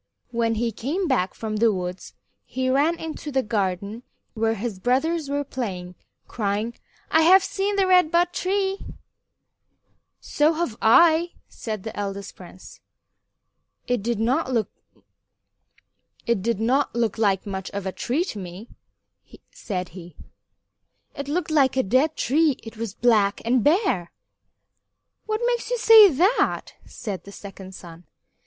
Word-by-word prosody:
When 230 -1 0
he 230 +1 -1
came 310 - -2
back 245 -10 0
from 215 -1 -4
the 225 +1 +4
woods 180 -1 -5 0.3
he 260 0 -2
ran 300 +6 +2
into 315 -2 -6
the 265 -1 +1
garden 200 +1 -2 0.3
where 225 0 0
his 215 -2 -5
brothers 280 - 0
were 285 0 -1
playing, 190 -10 -5 0.3
crying, 210 +1 -2 0.4
"I 320 - +5
have 370 +4 +6
seen 400 +1 -2
the 395 -1 +3
Red 365 -3 +4
Bud 345 +2 +2
Tree." 390 +1 -1 1.4
"So 300 +2 +1
have 320 -8 -2
I," 335 +8 +5
said 215 -4 -6
the 220 - -7
eldest 200 -1 -5
prince. 180 0 -13 1.1
"It 245 -3 -1
did 230 +1 -2
not 250 +3 0
look 230 -4 0 2.5
like 200 -4 +1
much 190 -2 -5
of 200 -1 -5
a 190 - -2
tree 265 - -1
to 225 - -6
me," 185 +5 -9 0.8
said 185 - -5
he; 170 -2 -12 1.0
"it 280 0 -6
looked 320 +2 -2
like 275 -4 +3
a 260 - +3
dead 260 +10 +2
tree. 295 +1 +2
It 225 0 -10
was 225 -2 -5
black 215 -4 +2
and 240 0 +2
bare." 300 - +1 1.2
"What 435 +1 -1
makes 480 -1 -1
you - - 0
say 445 -3 +8
that?" 370 - +1
said 200 -5 -6
the 200 - -12
second 195 -2 -10
son. 170 0 -12
240 Hz, 135 wpm, -24 LUFS, 200-320 Hz, 2.5 s, say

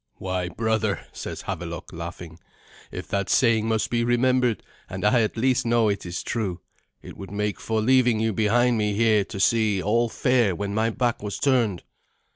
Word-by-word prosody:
"Why, 95 -1 -3
brother," 110 0 -1
says - - -7
Havelok, 85 +1 -6
laughing, 85 0 -8 0.5
"if - - -7
that 100 -2 -1
saying 115 -3 +3
must 110 -2 0
be 120 -1 +1
remembered 125 -1 +1 0.3
and - - -4
I 120 -2 +4
at 110 +1 -2
least 130 +2 +2
know 115 -2 +2
it 100 -3 -3
is 85 +1 -4
true 95 -6 -3 0.4
it - - -10
would 95 - -8
make 105 0 -2
for 110 -1 -1
leaving 125 -1 +3
you 110 0 0
behind 115 +3 +2
me 105 -1 0
here 110 -1 +3
to 100 - -8
see 110 -1 +2
all 115 +5 +1
fair 120 -6 +1
when 100 +2 -4
my 110 +2 +1
back 120 0 -1
was 105 -1 -4
turned." 120 -9 +1
110 Hz, 180 wpm, -24 LUFS, 100-120 Hz, 0.5 s, I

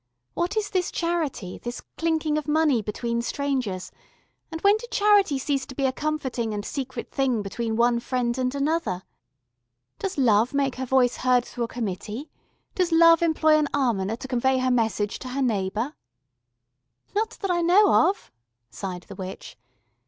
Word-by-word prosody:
"What 350 +5 -1
is 420 -1 -1
this 365 -2 0
Charity, 325 - -2
this 240 0 -6 0.2
clinking 320 -2 0
of 305 -1 -2
money 300 -5 +3
between 235 +3 -2
strangers, 235 -9 -2 0.6
and 325 - -4
when 400 +1 +5
did 480 +2 -10
Charity 410 - +4
cease 275 0 -1
to 260 - -9
be 275 - 0
a 260 - +2
comforting 260 -7 -2
and 205 0 -4
secret 260 -3 -5
thing 255 -6 0
between 225 +3 -3
one 235 +1 +3
friend 240 -1 -1
and 255 +1 -1
another? 280 - -1 1.0
Does 385 -5 -3
Love 235 -1 +3
make 275 -2 0
her 260 0 -3
voice 250 -1 +3
heard 250 -1 +2
through 240 -2 -3
a - - -7
committee, 220 - -5 0.4
does 365 -2 0
Love 330 0 +6
employ 315 -2 +4
an 300 - +1
almoner 225 -7 0
to 250 - -8
convey 260 +1 +1
her 255 0 +1
message 220 -3 0
to - - -8
her 270 +2 -2
neighbour?" 220 +3 -1 1.2
"Not 435 +2 -1
that 390 -3 0
I 345 -1 +1
know 360 0 +5
of," 395 - -6 0.4
sighed 180 - -6
the - - -11
witch. 190 -1 -8
260 Hz, 165 wpm, -25 LUFS, 235-315 Hz, 1.2 s, Love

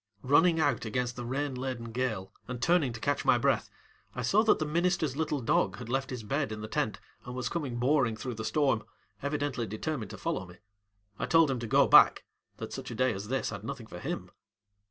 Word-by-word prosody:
Running 165 +5 +4
out 145 -6 +1
against 120 +2 -2
the 125 - -5
rain 140 +2 -1
laden 125 -3 -4
gale 110 -6 -2
and 125 -1 -5
turning 160 -1 +3
to 115 - -7
catch - - 0
my - - +5
breath, - - +1 0.5
I 125 - -3
saw 195 - +4
that 220 - +5
the 155 - -1
ministerŌĆÖs 170 -2 +1
little 150 -2 -1
dog 95 -5 +1
had 120 -1 -8
left 135 +1 -1
his 125 -3 -5
bed 135 +4 -1
in 105 0 -5
the 110 - -5
tent - - -1 0.2
and 125 - -7
was 125 -1 -2
coming 145 -8 -3
boring 125 -3 +2
through 125 +3 -4
the 110 0 -6
storm, 135 -2 +1 0.4
evidently 140 -4 -2
determined 110 0 -4
to - - -8
follow 95 - -3
me. 90 - -13 0.6
I - - -1
told 165 -4 +5
him 130 - -2
to 115 - -4
go - - +5
back, - - +6 0.3
that - - -6
such - - -6
a 120 - -6
day 130 +1 +2
as 100 +1 -6
this 130 0 -1
had 100 -2 -7
nothing 120 0 -6
for 90 -5 -9
him. - - -5
125 Hz, 220 wpm, -30 LUFS, 115-145 Hz, 0.6 s, back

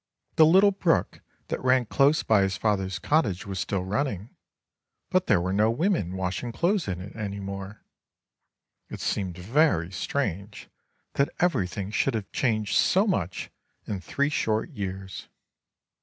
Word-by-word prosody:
The 155 - +7
little 190 +5 +6
brook 185 -4 0 0.3
that - - -3
ran 130 -1 +3
close 140 +7 +3
by 110 -3 +4
his 95 -2 0
father's 95 -3 0
cottage 125 - 0
was 95 -2 -4
still 95 0 -1
running; 105 +1 -3 0.8
but - - +2
there - - +4
were 90 +2 -2
no 105 +3 +3
women 115 - 0
washing 95 +5 -3
clothes 175 - 0
in 90 -2 -3
it 95 +3 -9
any 100 -3 -4
more. 100 +1 -7 1.1
It - - -7
seemed 95 -3 -2
very 95 - +2
strange 100 -1 -4 0.4
that 140 - +1
everything 100 - 0
should 125 +3 +1
have 100 -4 -4
changed 110 -4 0
so 195 +3 +4
much 95 - -2 0.3
in 100 -3 -4
three 140 - 0
short 110 0 -1
years. 95 -5 -6
105 Hz, 145 wpm, -26 LUFS, 95-140 Hz, 1.1 s, The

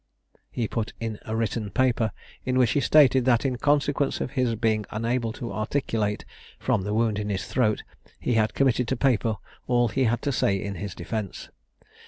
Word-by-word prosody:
He 115 - -2
put 110 -1 -3
in 110 -2 -4
a 110 - -3
written 110 -1 -1
paper, 120 -2 +1 0.3
in 130 0 0
which 125 -3 +4
he - - +2
stated 130 0 +5
that, 120 -2 +3
in 130 -2 0
consequence 145 0 +1
of - - -3
his 125 -4 +1
being 110 -1 +1
unable 115 +2 -1
to 120 -1 -6
articulate, 110 -2 -1 0.3
from - - 0
the 105 +2 -3
wound 110 -2 +1
in 105 0 -3
his 95 -2 -2
throat, 110 -5 +1 0.4
he - - 0
had 110 -1 +2
committed 125 -3 +2
to 130 - -1
paper 115 -4 +2 0.3
all 120 -1 +3
he 130 +4 +1
had 120 0 0
to 140 - +1
say 100 -5 +2
in 100 +1 -4
his 100 -3 -5
defence. 100 +2 -5
115 Hz, 190 wpm, -26 LUFS, 110-130 Hz, 0.4 s, stated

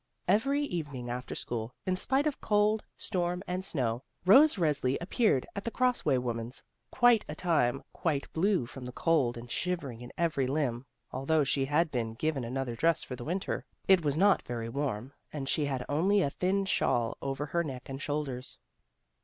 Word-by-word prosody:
Every 275 +7 +3
evening 145 - -4
after 125 +1 -5
school, 115 0 -4
in 185 - +1
spite 265 +9 +1
of 300 -3 -1
cold, 210 0 +2
storm 180 -2 0
and 180 +1 -3
snow, 125 -10 -1 0.2
Rose 275 +11 +7
Resli 145 -7 +1
appeared 180 - +2
at 200 - -4
the - - -1
Cross 250 +1 +1
way 135 -3 +3
woman's, 120 0 -3 0.4
many 240 -2 +8
a 150 - -4
time 145 -7 +1
quite 150 -5 -2
blue 185 - +2
from 130 +2 -10
the 125 - -5
cold 135 -5 +1
and 120 0 -9
shiver 175 -7 -2
ing 115 0 -11
in 120 - -9
every 155 -6 +1
limb; 130 -3 -1 0.2
although 145 +4 +1
she 135 0 +1
had 150 +3 +2
been 115 -3 -2
given 150 0 -1
another 125 0 -3
dress 165 +7 +2
for 130 - -6
the 120 - -8
Winter, 185 +4 -2 0.2
it 190 -3 +6
was 145 0 0
not 195 +2 +5
very 115 -1 -4
warm, 130 -1 -3 0.2
and 140 -3 -5
she 150 +2 +1
had 130 -3 -2
only 190 +7 +3
a 140 - 0
thin 195 +4 0
shawl 120 -10 +1
over 135 +1 -2
her 170 +3 0
neck 130 -5 -6
and 135 +1 -6
shoulders. 145 -4 -3
145 Hz, 185 wpm, -30 LUFS, 125-180 Hz, 0.4 s, many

